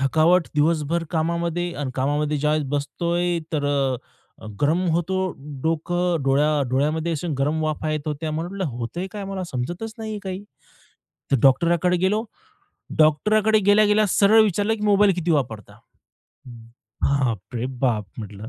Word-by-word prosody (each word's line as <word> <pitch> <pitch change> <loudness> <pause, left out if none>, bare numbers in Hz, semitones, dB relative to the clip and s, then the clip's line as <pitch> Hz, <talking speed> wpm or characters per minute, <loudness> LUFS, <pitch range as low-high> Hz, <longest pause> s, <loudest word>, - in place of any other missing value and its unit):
थकावट 160 +5 +3
दिवसभर 160 +2 +1
कामामध्ये 170 +1 -1
आणि 140 -3 -3
कामामध्ये 145 +3 0
ज्यावेळेस 150 0 +1
बसतोय, 170 +5 -1
तर 145 -2 -1 1.0
गरम 155 +5 +2
होतो 175 +3 0 0.5
डोकं, 170 0 0
डोळ्या 145 +2 +2
डोळ्यामध्ये 155 +5 0 0.2
गरम 150 +3 0
वाफा 155 0 -2
येत 155 0 -1
होत्या. 155 +1 -3
मला 165 +3 -3
म्हटलं 195 0 -4
होतंय 170 +11 -4
काय 205 -2 -5
मला 195 -1 -4
समजतच 175 - -4
नाहीये 220 -1 -5
काही, 190 +1 -5 0.9
तर 135 - +4
डॉक्टरकडे 170 +6 +3
गेलो. 205 +5 +1 0.7
डॉक्टरकडे 210 +8 +4
गेल्या-गेल्या 210 +1 +4
सरळ 210 +4 +5
विचारलं, 205 +2 +1
की 210 - -8
"मोबाईल 205 -1 +5
किती 175 -1 -2
वापरता." 110 -7 -3 0.7
हं, 115 -2 -12 0.4
बापरे 120 -3 -1
बाप! 115 -6 +1
म्हटलं, 105 0 -8
160 Hz, 130 wpm, -23 LUFS, 145-185 Hz, 1.0 s, सरळ